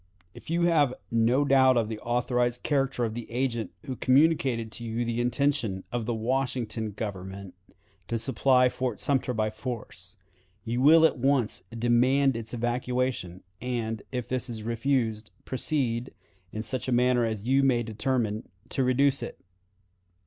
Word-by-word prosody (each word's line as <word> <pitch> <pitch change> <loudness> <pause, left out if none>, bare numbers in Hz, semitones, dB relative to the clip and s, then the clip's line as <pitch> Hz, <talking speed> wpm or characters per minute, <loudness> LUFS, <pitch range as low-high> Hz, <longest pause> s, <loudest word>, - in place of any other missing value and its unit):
"If - - -13
you 170 +1 +1
have 150 -7 +3 0.2
no 115 +5 +3
doubt 130 -2 +5
of 115 -2 +1
the 110 -1 -5
authorized 120 +1 0
character 135 -4 +1
of 110 - -3
the 120 0 -7
agent 120 -2 -1 0.2
who 130 -3 -4
communicated 130 -4 +2
to 120 - -8
you 115 +1 -2
the 115 +1 -1
intention 120 -6 0
of 120 -3 -3
the 120 - 0
Washington 120 -2 -1
Government 95 -2 -6 0.5
to 115 - -1
supply 125 +2 +3
Fort 125 -3 -3
Sumter 135 -2 0
by 110 -2 0
force, 110 -4 -7 0.5
you 120 +2 -1
will 160 +4 +7
at 155 - +2
once 130 -6 +1
demand 125 +4 +2
its 115 -1 -6
evacuation, 120 -5 -2 0.2
and, 115 -3 -2
if 125 -3 -3
this 130 0 -2
is 110 -2 -6
refused, 115 -2 -1 0.2
proceed, 130 -3 -1 0.4
in 110 - -4
such 125 +4 -3
a - - -1
manner 125 0 +3
as 110 -1 -3
you 135 +2 +4
may 125 -3 +3
determine, 110 -1 -2 0.2
to 135 - 0
reduce 135 +2 +3
it. - - -7
120 Hz, 155 wpm, -27 LUFS, 115-130 Hz, 0.5 s, will